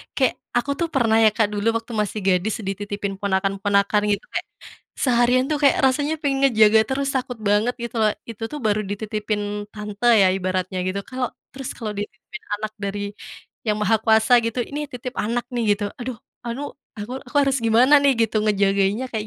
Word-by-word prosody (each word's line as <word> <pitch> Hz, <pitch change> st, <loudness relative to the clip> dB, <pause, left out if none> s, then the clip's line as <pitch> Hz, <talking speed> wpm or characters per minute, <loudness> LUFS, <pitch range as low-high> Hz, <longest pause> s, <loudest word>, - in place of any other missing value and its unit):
kayak 260 Hz, -3 st, +2 dB, 0.2 s
aku 280 Hz, +4 st, 0 dB
tuh 340 Hz, -, +1 dB
pernah 225 Hz, -4 st, +3 dB
ya, 220 Hz, -, +7 dB
Kak, 220 Hz, -, +3 dB
dulu 205 Hz, +2 st, -1 dB
waktu 230 Hz, +1 st, -9 dB
masih 210 Hz, +1 st, -3 dB
gadis 190 Hz, +3 st, +2 dB
dititipin 200 Hz, +1 st, -4 dB
ponakan-ponakan 200 Hz, +1 st, +1 dB
gitu 205 Hz, 0 st, 0 dB
kayak -, -, -3 dB, 0.5 s
seharian 250 Hz, 0 st, +3 dB
tuh 300 Hz, -, +2 dB
kayak 280 Hz, -, +5 dB
rasanya 290 Hz, +4 st, +1 dB
aku 305 Hz, -, -31 dB
yang 270 Hz, -1 st, +1 dB
ngejaga 220 Hz, -4 st, +5 dB
terus 275 Hz, +1 st, 0 dB
takut 250 Hz, -2 st, -3 dB
banget 210 Hz, +4 st, +3 dB
gitu 235 Hz, 0 st, -5 dB
loh. 215 Hz, -, +4 dB, 0.2 s
Itu 225 Hz, 0 st, -10 dB
tuh 300 Hz, -, -5 dB
baru 210 Hz, 0 st, +2 dB
dititipin 210 Hz, +1 st, -3 dB, 0.3 s
tante 210 Hz, 0 st, -7 dB, 0.2 s
ya 190 Hz, -, +6 dB
ibaratnya 185 Hz, 0 st, -2 dB
gitu, 200 Hz, +1 st, -2 dB
kalo 255 Hz, -1 st, -3 dB, 0.3 s
terus 270 Hz, -1 st, -6 dB
kalau 215 Hz, -2 st, -4 dB
dititipin 240 Hz, -, -7 dB, 0.2 s
anak 215 Hz, 0 st, -4 dB
dari 200 Hz, +1 st, -3 dB, 0.7 s
Yang 210 Hz, -1 st, +1 dB
Maha 225 Hz, +1 st, +4 dB
Kuasa 220 Hz, +2 st, +3 dB
gitu, 230 Hz, +2 st, -3 dB
"Ini 290 Hz, -, -4 dB
titip 250 Hz, 0 st, -6 dB
anak 235 Hz, +3 st, -1 dB
nih," 235 Hz, -, 0 dB
gitu 205 Hz, 0 st, -5 dB, 0.2 s
aduh, 250 Hz, +1 st, -4 dB, 0.3 s
"Alu 235 Hz, +5 st, -4 dB, 0.4 s
aku 210 Hz, +5 st, -6 dB
aku 245 Hz, -, -6 dB
harus 275 Hz, -1 st, +1 dB
gimana 240 Hz, +6 st, +5 dB
nih 280 Hz, -1 st, +5 dB
gitu 220 Hz, -, -4 dB
ngejagainnya 200 Hz, +3 st, +2 dB
kayak 215 Hz, -1 st, -3 dB
220 Hz, 185 wpm, -22 LUFS, 205-250 Hz, 0.7 s, ya